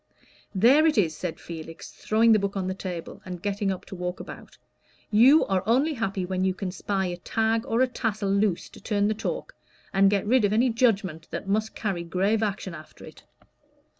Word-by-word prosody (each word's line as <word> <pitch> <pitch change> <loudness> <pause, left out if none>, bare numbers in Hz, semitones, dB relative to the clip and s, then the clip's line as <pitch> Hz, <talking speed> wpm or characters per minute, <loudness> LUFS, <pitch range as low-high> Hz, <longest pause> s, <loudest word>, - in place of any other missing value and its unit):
"There 265 +11 +5
it 310 - +1
is!" 165 -7 +2
said 165 -2 -5
Felix, 165 -1 -9
throwing 225 +1 +2
the 215 - +6
book 200 0 -2
on 190 - -1
the 185 - -2
table, 180 -3 -7
and 180 -1 -7
getting 200 +1 -2
up 185 - -6
to - - -9
walk 180 0 -4
about. - - -10 0.5
"You 255 +9 +6
are 190 -1 0
only 270 +7 +3
happy 195 -7 -2
when 185 0 -2
you 190 -1 +1
can 185 -1 -4
spy 190 +1 -2
a 175 -1 -3
tag 225 +6 0
or 230 -1 +1
a 260 - +4
tassel 215 -5 -2
loose 200 -3 +1
to - - -15
turn 205 -1 +1
the - - +1
talk, 215 - -4 0.4
and 195 0 +5
get 200 -1 0
rid 245 +2 +3
of 205 0 +2
any 240 +3 +3
judgment 210 -9 0
that - - -6
must 215 +2 -1
carry 195 -5 -2
grave 195 +6 0
action 200 -4 -2
after 155 -2 -12
it." - - -14
200 Hz, 205 wpm, -26 LUFS, 185-225 Hz, 0.5 s, the